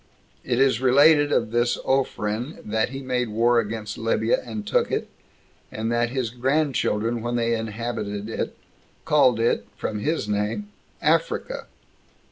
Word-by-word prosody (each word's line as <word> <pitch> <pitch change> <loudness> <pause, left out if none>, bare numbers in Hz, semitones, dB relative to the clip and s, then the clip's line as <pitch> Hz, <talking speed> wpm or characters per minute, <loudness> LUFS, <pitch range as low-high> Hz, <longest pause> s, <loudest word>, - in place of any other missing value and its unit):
It 120 0 0
is 135 -3 +3
related 145 +3 +5
of 115 -2 +1
this 120 +1 +1
Ophren, 125 -1 -1
that 110 +2 0
he 135 +1 -6
made 125 -2 -1
war 115 +2 +3
against 110 -1 -4
Libya, 115 0 +1
and 110 -3 -6
took - - +1
it, - - -1 0.6
and 110 +1 -3
that 120 0 +1
his 125 -3 -2
grandchildren, 125 -4 0
when 120 +1 -2
they 115 -1 +1
inhabited 110 -2 -4
it, 115 - -4 0.5
called 130 -6 +4
it 115 - +1
[from 105 - -3
his 150 -2 -1
name] 105 - -2 0.3
Africa. - - 0
120 Hz, 140 wpm, -24 LUFS, 110-130 Hz, 0.6 s, related